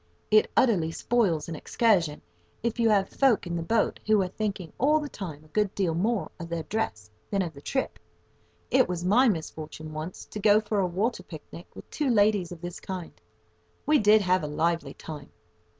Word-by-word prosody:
It 215 0 +5
utterly 180 -10 +3
spoils 180 -6 +1
an 165 - -5
excursion 175 -5 +1 0.4
if 235 0 -1
you 230 -1 +4
have 200 -2 +3
folk 265 -8 +2
in 175 -1 -3
the 170 - -2
boat 220 +6 +1
who 215 -1 +5
are - - -2
thinking 195 -4 -4
all 300 +4 +4
the 300 - -4
time 160 - -7
a - - -21
good 210 +2 0
deal 185 -5 +1
more 205 +5 0
of 170 0 -7
their 170 -1 -3
dress 110 - -3 0.2
than 200 -2 +1
of 165 -3 -5
the 140 - -12
trip. 265 - -2 0.7
It 260 -5 +4
was 175 -1 -3
my 240 +8 +5
misfortune 155 -3 -5
once 155 +4 -6
to 210 - -5
go 210 +1 +5
for 210 -1 -2
a 190 - +2
water 200 +8 -1
picnic - - -11
with - - -11
two 295 -3 -1
ladies 205 -5 +3
of 170 -2 -9
this 175 -1 -6
kind. 185 -3 -6 0.7
We 300 0 +4
did 210 0 +5
have 185 0 +2
a 150 - -3
lively 160 -1 -1
time! 150 -3 -9
190 Hz, 200 wpm, -27 LUFS, 165-215 Hz, 0.7 s, It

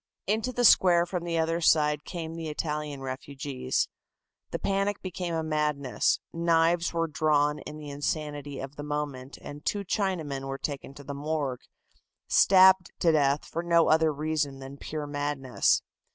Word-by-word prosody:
Into 220 +5 0
the 245 0 +1
square 175 -4 +6
from 175 -1 -4
the 170 -1 -1
other 165 +1 0
side 150 -2 +3
came 165 -3 -5
the 165 -1 -5
Italian 150 -2 -3
refugees. 135 0 -3 0.6
The - - -3
panic 200 +1 0
became 180 -2 -3
a 160 - -1
madness, 150 -4 0
knives 170 0 +2
were 165 -1 0
drawn 150 -1 +1
in 150 - -8
the 150 -1 -8
insanity 145 -1 -3
of 135 +2 -7
the 145 - -5
moment, 145 -3 -4
and 145 +1 -9
two 200 -1 -1
Chinamen 160 -10 -2
were 135 0 -4
taken 140 -1 -5
to 140 - -11
the 140 - -6
morgue, 140 -3 -2 0.7
stabbed 190 -1 +6
to 170 - +3
death 145 -2 +2
for 165 - -4
no 170 -1 +3
other 160 0 +4
reason 150 -2 -2
than 135 +1 -9
pure 150 +1 -5
madness. 145 -3 0
150 Hz, 160 wpm, -28 LUFS, 145-170 Hz, 0.7 s, square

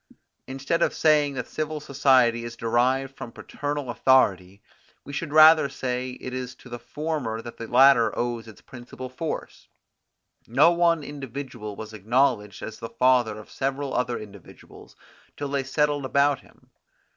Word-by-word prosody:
Instead 135 +5 -2
of - - +1
saying 150 -3 +3
that 125 -2 -3
civil 155 0 -4
society 130 -5 +3
is 120 0 -7
derived 130 +4 0
from 115 - -8
paternal 145 -1 -5
authority, 100 -7 +2 0.4
we 140 - -10
should 150 +1 -4
rather 155 -1 +7
say 125 0 -4
that - - -13
it 130 - -5
is 130 0 -5
to 125 - -16
the 120 0 -7
former 150 -8 -4
that 120 +1 -9
the 115 - -7
latter 125 -3 +5
owes 120 -1 -3
its 110 - -14
principal 130 0 -10
force: 155 +5 -6 0.8
No 140 +9 +5
one 170 -2 +2
individual 135 -6 -7
was 110 +1 -9
acknowledged 110 -1 0
as 110 - -7
the 115 - -6
father 120 -3 +2
of 110 - -12
several 135 +1 -3
other 125 -1 -1
individuals, 100 -3 -13 0.4
till 145 -1 -4
they 140 -1 -1
settled 145 +1 0
about 140 +1 +2
him. - - -24
130 Hz, 155 wpm, -25 LUFS, 115-145 Hz, 0.8 s, rather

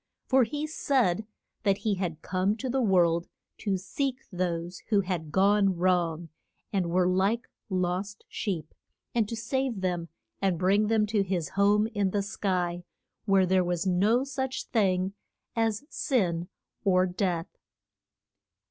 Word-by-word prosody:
For 260 -2 +4
he 295 +6 -3
said 245 - +1 0.3
that 195 -2 +2
he 215 0 0
had 180 -5 -3
come 190 +3 0
to 260 +2 -4
the 265 +1 +1
world 175 -5 +3 0.3
to 200 -3 0
seek 260 +8 -2
those 175 -1 -2
who 205 -3 +4
had 175 -5 -3
gone 195 +1 +4
wrong, 170 -2 +1 0.4
and 185 -4 +1
were 180 +1 +3
like 195 +6 +1 0.2
lost 185 +2 -2
sheep, 180 -8 -4 0.4
and 225 -3 +1
to 230 - -3
save 235 -1 -1
them 175 -2 -1 0.3
and 190 -3 +2
bring 200 +4 +3
them 220 -1 +3
to 210 -1 +1
his 180 -5 -1
home 205 +2 +3
in 205 -4 0
the 200 +1 0
sky, 180 -4 -1 0.4
where 195 -2 +4
there 185 0 +3
was 175 0 -1
no 205 +7 +3
such 265 -1 -3
thing 190 -3 +1 0.4
as 225 0 +1
sin 180 - 0 0.4
or 185 -2 +4
death. 180 -2 -2
195 Hz, 145 wpm, -28 LUFS, 180-220 Hz, 0.4 s, For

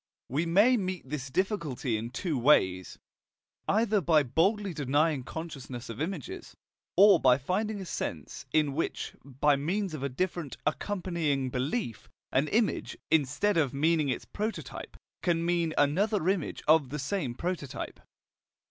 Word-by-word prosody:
We 155 +6 0
may 210 +9 +5
meet 185 -7 -3
this 135 -1 -4
difficulty 150 - -1
in 110 +2 -3
two 160 +5 -2
ways, 95 -9 +3 0.7
either 215 -1 +2
by 155 -2 +4
boldly 190 - +1
denying 145 +1 +1
consciousness 135 -6 -7
of 115 +4 -6
images, 165 -4 -5 0.4
or 200 -2 +8
by 125 -3 +5
finding 200 +9 -2
a 190 - -6
sense 80 - -5
in 150 -3 +2
which, 160 - -3
by 140 +2 +2
means 180 +6 -1
of 155 - -5
a 140 - -1
different 170 +1 -3
accompanying 155 -6 -1
belief, 130 - -3 0.2
an 140 +3 +2
image, 215 +4 0
instead 160 +6 +2
of 145 -4 +1
meaning 155 0 +2
its 130 - -2
prototype, 215 +2 -5 0.2
can 170 -2 +1
mean 170 -2 +1
another 180 +6 +2
image 190 -5 -1
of 155 -4 +5
the 150 - -4
same 140 -3 -2
prototype. 170 -4 -4
155 Hz, 140 wpm, -29 LUFS, 135-185 Hz, 0.7 s, or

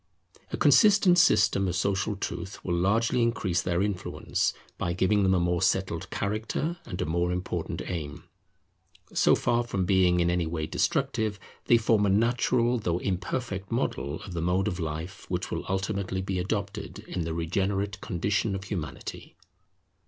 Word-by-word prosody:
A - - -2
consistent 200 -5 +6
system 100 - +4
of 90 - -1
social 100 +3 0
truth 95 0 -6
will 90 - 0
largely 115 +8 +2
increase 95 -6 +1
their 90 +1 0
influence, 100 -3 -1 0.3
by 85 - -1
giving 95 +3 +2
them 95 -1 +3
a - - +3
more 85 0 +1
settled 95 -2 0
character 110 - -2
and 90 - -6
a - - 0
more 85 +3 0
important 90 +1 -3
aim. 75 -5 -5 0.9
So - - +5
far 120 0 +1
from 100 -6 -2
being 90 -2 +3
in 85 0 +2
any 85 -2 0
way 80 -1 -2
destructive, 105 +5 0 0.3
they 120 - +6
form 110 -2 +3
a - - +2
natural 120 +3 +2
though 85 -5 0
imperfect 95 +2 -3
model 70 +3 -1
of 95 - -8
the 85 - -2
mode 90 +4 +1
of 95 -3 -2
life 80 +3 -5
which - - -2
will - - -3
ultimately 95 0 -2
be 95 -1 -2
adopted 100 +2 -3
in 90 - -3
the 80 0 -3
regenerate 95 +4 -1
condition 100 +3 -1
of 95 - -5
Humanity. 85 -8 -6
95 Hz, 160 wpm, -27 LUFS, 90-105 Hz, 0.9 s, consistent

